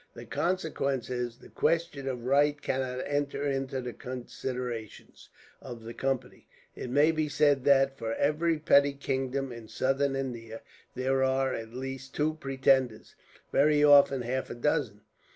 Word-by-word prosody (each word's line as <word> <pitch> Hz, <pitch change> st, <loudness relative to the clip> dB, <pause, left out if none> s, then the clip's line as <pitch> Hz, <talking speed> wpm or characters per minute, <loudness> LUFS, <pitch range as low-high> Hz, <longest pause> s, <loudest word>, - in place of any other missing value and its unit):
The -, -, -9 dB
consequence 150 Hz, -8 st, -1 dB
is, 120 Hz, -1 st, -3 dB
the -, -, -16 dB
question 165 Hz, -5 st, 0 dB
of 125 Hz, -3 st, -4 dB
right 145 Hz, +2 st, +3 dB
cannot 130 Hz, -2 st, -2 dB
enter 145 Hz, 0 st, -1 dB
into 135 Hz, -1 st, -2 dB
the 125 Hz, -1 st, -6 dB
considerations 125 Hz, -2 st, -6 dB, 0.3 s
of 120 Hz, -3 st, -9 dB
the 115 Hz, +1 st, -7 dB
Company. 130 Hz, -1 st, -3 dB, 0.3 s
It -, -, -6 dB
may 145 Hz, +5 st, +4 dB
be 155 Hz, -1 st, -1 dB
said 145 Hz, -2 st, +2 dB
that, 135 Hz, -1 st, +4 dB
for 115 Hz, 0 st, -2 dB
every 160 Hz, +3 st, +1 dB
petty 145 Hz, -2 st, +4 dB
kingdom 135 Hz, -1 st, -2 dB
in 115 Hz, -2 st, -9 dB
Southern 135 Hz, +5 st, 0 dB
India, 115 Hz, -4 st, -5 dB, 0.3 s
there 135 Hz, +1 st, +1 dB
are 130 Hz, 0 st, +1 dB
at 115 Hz, +1 st, -6 dB
least 135 Hz, +1 st, -6 dB
two 155 Hz, +1 st, +1 dB
pretenders, 135 Hz, -5 st, +1 dB, 0.4 s
very 150 Hz, +1 st, +4 dB
often 140 Hz, -3 st, +6 dB
half 130 Hz, +2 st, -2 dB
a -, -, -5 dB
dozen. 120 Hz, -5 st, -1 dB
135 Hz, 150 wpm, -29 LUFS, 125-145 Hz, 0.4 s, often